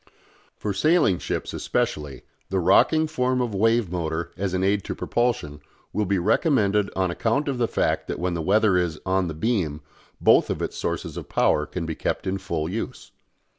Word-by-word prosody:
For 105 Hz, -, -3 dB
sailing 150 Hz, -, +3 dB
ships -, -, -3 dB
especially, 75 Hz, -3 st, -2 dB, 0.3 s
the 95 Hz, -, 0 dB
rocking 155 Hz, -, +4 dB
form 130 Hz, -4 st, 0 dB
of 120 Hz, -4 st, -1 dB
wave 115 Hz, -1 st, +2 dB
motor 85 Hz, -1 st, -3 dB
as 95 Hz, -1 st, -2 dB
an 95 Hz, -, 0 dB
aid 100 Hz, 0 st, +2 dB
to -, -, -4 dB
propulsion 95 Hz, -12 st, -1 dB, 0.3 s
will 105 Hz, -2 st, 0 dB
be 100 Hz, +1 st, +1 dB
recommended 105 Hz, -, +2 dB
on 95 Hz, -2 st, +1 dB
account 115 Hz, +11 st, 0 dB
of 135 Hz, -3 st, -2 dB
the 120 Hz, -, +2 dB
fact -, -, 0 dB
that -, -, -3 dB
when 90 Hz, 0 st, -1 dB
the 85 Hz, -, -2 dB
weather 100 Hz, +2 st, +3 dB
is 85 Hz, -3 st, -1 dB
"on 95 Hz, -1 st, +1 dB
the 80 Hz, -, -5 dB
beam" 80 Hz, -6 st, -1 dB, 0.4 s
both -, -, +5 dB
of -, -, -2 dB
its -, -, -3 dB
sources -, -, -3 dB
of -, -, -7 dB
power 75 Hz, -, +2 dB
can 90 Hz, -2 st, -4 dB
be 80 Hz, -, -3 dB
kept -, -, -3 dB
in 95 Hz, +1 st, -1 dB
full 85 Hz, -5 st, -3 dB
use. 105 Hz, +7 st, -5 dB
95 Hz, 190 wpm, -24 LUFS, 85-115 Hz, 0.4 s, both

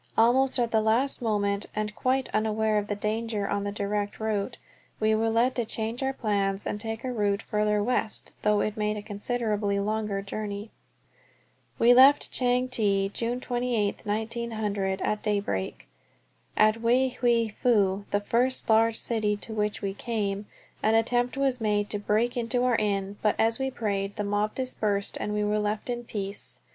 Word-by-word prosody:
Almost 255 Hz, +4 st, +4 dB
at 240 Hz, -2 st, +1 dB
the 220 Hz, -, +3 dB
last 235 Hz, +6 st, +1 dB
moment, 205 Hz, -3 st, 0 dB
and 210 Hz, 0 st, -2 dB
quite 260 Hz, 0 st, 0 dB
unaware 215 Hz, 0 st, +1 dB
of 205 Hz, -, -5 dB
the 205 Hz, -, -2 dB
danger 215 Hz, 0 st, -2 dB
on 200 Hz, 0 st, -1 dB
the 205 Hz, -, -2 dB
direct 205 Hz, 0 st, -2 dB
route, 220 Hz, +1 st, -2 dB, 0.4 s
we 215 Hz, 0 st, +3 dB
were 225 Hz, +1 st, +2 dB
led 235 Hz, +3 st, +2 dB
to 240 Hz, -, -1 dB
change 225 Hz, +2 st, -2 dB
our 265 Hz, 0 st, +1 dB
plans 200 Hz, -5 st, -1 dB
and 210 Hz, -, -3 dB
take 225 Hz, 0 st, -4 dB
a 255 Hz, -1 st, -2 dB
route 205 Hz, -2 st, 0 dB
farther 210 Hz, 0 st, +1 dB
west, 225 Hz, -2 st, -1 dB
though 210 Hz, -1 st, +3 dB
it 215 Hz, -, -1 dB
made 210 Hz, 0 st, -1 dB
a 205 Hz, -, -6 dB
considerably 210 Hz, -1 st, -1 dB
longer 210 Hz, -1 st, -1 dB
journey. 205 Hz, +1 st, -5 dB, 1.1 s
We 240 Hz, +1 st, +6 dB
left 270 Hz, +3 st, +6 dB
Chang 250 Hz, 0 st, +1 dB
Te, 200 Hz, -5 st, +1 dB
June 235 Hz, +4 st, -2 dB
28, 240 Hz, -5 st, -1 dB
1900, 215 Hz, -3 st, -2 dB
at 210 Hz, -, -1 dB
daybreak. 200 Hz, -, -2 dB, 0.7 s
At 215 Hz, +1 st, +4 dB
Wei 250 Hz, +3 st, +3 dB
Hwei 235 Hz, -2 st, +3 dB
Fu, 200 Hz, -5 st, +2 dB
the 205 Hz, -, +1 dB
first 245 Hz, +5 st, 0 dB
large 225 Hz, 0 st, +4 dB
city 215 Hz, -3 st, 0 dB
to 220 Hz, -, -7 dB
which 210 Hz, -1 st, -2 dB
we 195 Hz, -1 st, -1 dB
came, 205 Hz, -2 st, -3 dB, 0.3 s
an 220 Hz, +1 st, +3 dB
attempt 245 Hz, +3 st, +1 dB
was 265 Hz, -3 st, +1 dB
made 210 Hz, -1 st, 0 dB
to 205 Hz, -, 0 dB
break 215 Hz, +4 st, +1 dB
into 245 Hz, +1 st, 0 dB
our 250 Hz, -2 st, +3 dB
inn, 200 Hz, -1 st, -1 dB
but 210 Hz, -, +2 dB
as 225 Hz, +2 st, +2 dB
we 265 Hz, 0 st, 0 dB
prayed 200 Hz, -5 st, -2 dB
the 210 Hz, -, -2 dB
mob 205 Hz, +1 st, -1 dB
dispersed 210 Hz, -6 st, -1 dB
and 210 Hz, -, -2 dB
we 210 Hz, 0 st, 0 dB
were 210 Hz, +1 st, +1 dB
left 210 Hz, +3 st, -2 dB
in 240 Hz, 0 st, -4 dB
peace. 200 Hz, -2 st, -2 dB
215 Hz, 175 wpm, -27 LUFS, 205-235 Hz, 1.1 s, We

